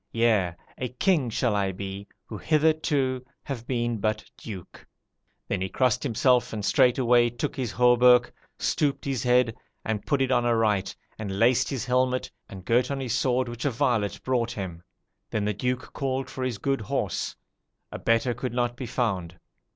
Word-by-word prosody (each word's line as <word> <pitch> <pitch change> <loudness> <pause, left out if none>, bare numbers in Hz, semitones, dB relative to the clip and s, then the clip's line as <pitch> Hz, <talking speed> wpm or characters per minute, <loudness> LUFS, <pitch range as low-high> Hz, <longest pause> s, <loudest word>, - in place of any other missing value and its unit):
Yea, 110 -7 +2 0.2
a 125 - -2
king 140 +1 +1
shall 115 0 0
I 100 -1 +1
be, 95 +1 -6 0.2
who 110 - -8
hitherto 150 -4 +1 0.2
have 120 -4 -6
been 120 -3 -1
but 110 +1 -1
duke.' 95 -6 -9 0.6
Then 100 - -2
he 95 - -2
crossed 125 +2 +1
himself 125 -1 +2
and 105 -2 -3
straightway 125 -2 +4
took 120 +5 -4
his 125 -5 -2
hauberk, 125 +1 +5 0.2
stooped 145 -2 0
his 135 -4 -1
head, 125 -2 +3 0.3
and 110 -2 -2
put 140 - 0
it 130 - -1
on 120 -2 +3
aright, 110 -4 +1 0.2
and 100 -3 -4
laced 120 +3 +3
his 135 -4 -3
helmet, 130 0 +1 0.2
and 95 -1 -10
girt 120 +2 +2
on 140 -1 -2
his 125 -4 -2
sword, 130 0 +1
which 120 0 -6
a 145 - +2
varlet 120 -5 0
brought 125 -2 0
him. 90 -5 -6 0.5
Then 105 -1 -1
the 105 - 0
Duke 125 +4 -3
called 135 -1 -2
for 130 - -4
his 125 -4 -2
good 135 +4 -1
horse 105 - -2 0.6
a - - -6
better 115 +2 +2
could 125 0 -4
not 120 0 0
be 125 0 -6
found. 95 -8 -2
120 Hz, 175 wpm, -26 LUFS, 110-130 Hz, 0.6 s, hauberk